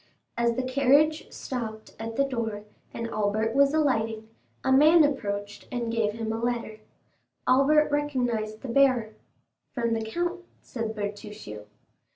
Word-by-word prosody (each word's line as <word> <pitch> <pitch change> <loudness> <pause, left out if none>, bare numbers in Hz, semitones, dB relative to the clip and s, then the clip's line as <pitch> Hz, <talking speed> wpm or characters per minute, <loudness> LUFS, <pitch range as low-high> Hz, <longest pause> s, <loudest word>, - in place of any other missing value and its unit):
As 235 0 +1
the 260 - -1
carriage 280 +4 +3
stopped 220 -4 -6
at 225 0 -5
the 275 - +3
door, 230 -6 -3 0.3
and 230 - -4
Albert 215 +2 0
was 280 +1 +4
alighting, 225 -8 0 0.3
a 265 - +1
man 305 +5 +7
approached 205 -8 -2
and 240 -2 -2
gave 225 -2 0
him 225 0 -3
a 225 - -3
letter. 235 -3 -2 0.7
Albert 290 +4 +4
recognized 245 -7 -1
the - - -5
bearer. 250 -3 +3 0.6
"From 235 -2 0
the 225 - -1
count," 345 +11 -2 0.2
said 225 -2 -5
Bertuccio. 205 - -6
235 Hz, 140 wpm, -27 LUFS, 220-275 Hz, 0.7 s, man